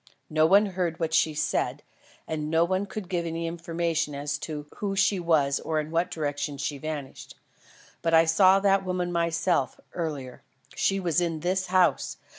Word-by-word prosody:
No 155 0 +4
one 200 +4 +6
heard 180 -4 -2
what 160 -1 -1
she 160 -1 +3
said; 150 - -1 0.4
and 150 -1 -3
no 165 +1 +3
one 190 +3 -1
could 200 -1 -6
give 175 -2 -1
any 165 0 -3
information 165 -2 -2
as 145 0 -3
to 150 -1 -6
who 200 -1 -2
she 195 0 +2
was 155 -5 +2
or 155 -1 -1
in 155 +1 -4
what 170 +2 +1
direction 145 -2 -3
she 140 +1 -3
vanished. 150 -3 -6 0.7
But 165 -1 +2
I 165 0 +6
saw 185 +4 +5
that 195 -1 +3
woman 180 -1 -2
myself, 170 +1 0
earlier. 145 -7 -5 0.3
She 195 0 +1
was 175 -2 +1
in 165 -3 -2
this 185 +2 0
house. 185 -1 +2
165 Hz, 175 wpm, -27 LUFS, 155-180 Hz, 0.7 s, one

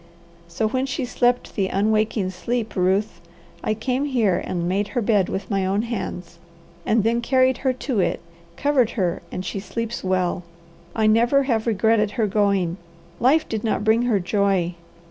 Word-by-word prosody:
So 215 +6 -1
when 260 +4 -1
she 270 -1 -2
slept 245 0 0
the 195 -3 +1
unwaking 215 -1 +1
sleep, 225 +5 -3
Ruth, 190 +3 0 0.4
I 215 - 0
came 255 +5 -1
here 220 -10 +1
and 175 -1 -2
made 195 +3 0
her - - +3
bed 205 -3 +2
with 195 +2 -4
my 195 -1 +1
own 195 +3 0
hands, 185 -7 -5 0.5
and 220 -1 +3
then 230 +2 +1
carried 255 +1 +2
her 265 - +1
to 255 -2 -2
it, - - +1 0.4
covered 275 -5 +2
her, 180 -4 0
and 185 - -5
she 195 - -3
sleeps 230 +3 -4
well. 185 -1 0 0.5
I 220 - +1
never 235 +6 +4
have 235 -4 0
regretted 220 0 +2
her 225 - +2
going. 200 -4 +1 0.4
Life 280 +6 +3
did 220 -2 -3
not 220 -2 0
bring 220 +2 +3
her 240 -4 +2
joy. 190 -2 +1
215 Hz, 170 wpm, -22 LUFS, 190-240 Hz, 0.5 s, never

